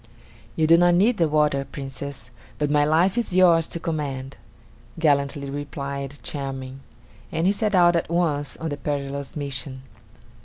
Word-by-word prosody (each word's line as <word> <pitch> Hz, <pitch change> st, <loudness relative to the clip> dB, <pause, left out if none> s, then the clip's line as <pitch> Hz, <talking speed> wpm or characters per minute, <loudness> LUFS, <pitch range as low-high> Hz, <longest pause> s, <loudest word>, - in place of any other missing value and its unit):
"You 160 Hz, -, +2 dB
do 165 Hz, +2 st, +6 dB
not 175 Hz, 0 st, +5 dB
need 215 Hz, +6 st, +3 dB
the 165 Hz, -3 st, +2 dB
water, 150 Hz, -2 st, +2 dB
Princess; 135 Hz, 0 st, -8 dB, 0.3 s
but 150 Hz, -1 st, 0 dB
my 145 Hz, 0 st, +4 dB
life 170 Hz, +8 st, +3 dB
is 215 Hz, -6 st, -3 dB
yours 170 Hz, -3 st, +5 dB
to 170 Hz, -, -4 dB
command," 140 Hz, -5 st, -4 dB, 0.6 s
gallantly 140 Hz, -3 st, +1 dB
replied 140 Hz, -1 st, -5 dB
Charming; 135 Hz, -2 st, -5 dB, 0.5 s
and 165 Hz, +1 st, -1 dB
he 195 Hz, -, +4 dB
set 210 Hz, -1 st, 0 dB
out 175 Hz, -1 st, +5 dB
at 170 Hz, -, 0 dB
once 160 Hz, -4 st, 0 dB
on 160 Hz, -, -4 dB
the 145 Hz, -, -4 dB
perilous 140 Hz, -1 st, -4 dB
mission. 130 Hz, -2 st, -4 dB
145 Hz, 155 wpm, -24 LUFS, 140-170 Hz, 0.6 s, do